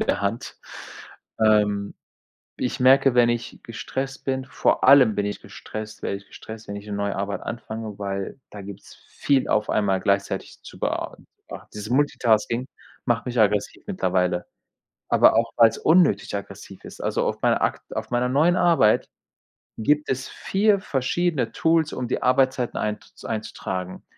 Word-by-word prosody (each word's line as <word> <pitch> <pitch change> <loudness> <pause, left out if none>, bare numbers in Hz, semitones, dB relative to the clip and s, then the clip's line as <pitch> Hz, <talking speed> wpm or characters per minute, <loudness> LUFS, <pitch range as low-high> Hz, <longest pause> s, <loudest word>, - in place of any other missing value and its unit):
der - - 0
Hand. 100 +4 -3 0.8
Ähm, 105 -2 +2 0.6
ich 125 - -3
merke, 135 0 +5
wenn 120 -1 +5
ich 120 0 -3
gestresst 135 +4 -5
bin 130 -1 -1
vor 125 - +1
allem 130 -5 +7
bin 100 - -1
ich 105 - -4
gestresst 110 0 -9
werde 100 - -2
ich 100 - -14
gestresst, 110 0 -10
wenn 100 - -5
ich 100 +1 -9
'ne 105 - -6
neue 100 0 -2
Arbeit 100 +1 -3
anfange, 110 -3 -6
weil 100 +5 -4
da 105 -1 -9
gibt's 100 0 -11
viel 140 -2 +1
auf 105 0 +1
einmal 95 -3 +1
gleichzeitig 100 0 -1
zu - - -12
bea - - -2 0.3
be - - -7
Dieses 105 +1 -6
Multitasking 125 -3 +1 0.4
macht 120 -1 0
mich 125 -1 -3
aggressiv 105 -1 +1
mittlerweile. 90 - 0 0.6
Aber - - +5
auch, 115 0 +1
weil's 115 -1 +5
unnötig 160 - +3
aggressiv 100 -1 -8
ist. - - -10
Also - - 0
auf - - -3
meiner - - +3
akt - - 0
auf - - -4
meiner 125 +1 +1
neuen 160 +7 +3
Arbeit 165 -13 +3 0.7
gibt 150 +6 +1
es 130 0 -2
4 200 +1 +1
verschiedene 140 -3 -1
Tools, 160 -1 +2
um 125 -1 -3
die 125 - -2
Arbeitszeiten 130 -1 +1
einzu 105 0 -5
einzutragen. 95 -4 -5
115 Hz, 155 wpm, -24 LUFS, 100-130 Hz, 0.8 s, allem